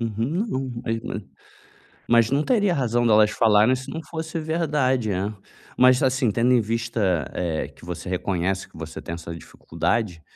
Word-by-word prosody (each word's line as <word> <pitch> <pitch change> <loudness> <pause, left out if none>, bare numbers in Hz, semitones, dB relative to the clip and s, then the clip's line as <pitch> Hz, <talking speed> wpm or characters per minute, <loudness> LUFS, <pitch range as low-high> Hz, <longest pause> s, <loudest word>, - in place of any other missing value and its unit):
Uhum, 115 - -1
um 130 -3 -3
é 115 - -1
é, 115 -1 -5 0.9
mas 115 -1 +4
não 140 +2 +2
teria 205 -7 +2
razão 120 -5 +1
delas 105 -1 +5
falarem 110 +2 +4
se 130 +2 -6
não 160 - -4
fosse 160 0 -5
verdade, 150 -7 0
né, 100 +3 -2 0.4
mas 130 0 +5
assim 130 -3 +2
tendo 115 +4 +2
em 125 - +5
vista, 110 - -1
eh, 85 -3 -2
que - - -17
você 85 0 -6
reconhece 95 +1 -1
que - - -18
você 80 0 -7
tem 85 - -5
essa 85 0 -7
dificuldade. 90 +1 -3
115 Hz, 170 wpm, -24 LUFS, 95-130 Hz, 0.9 s, delas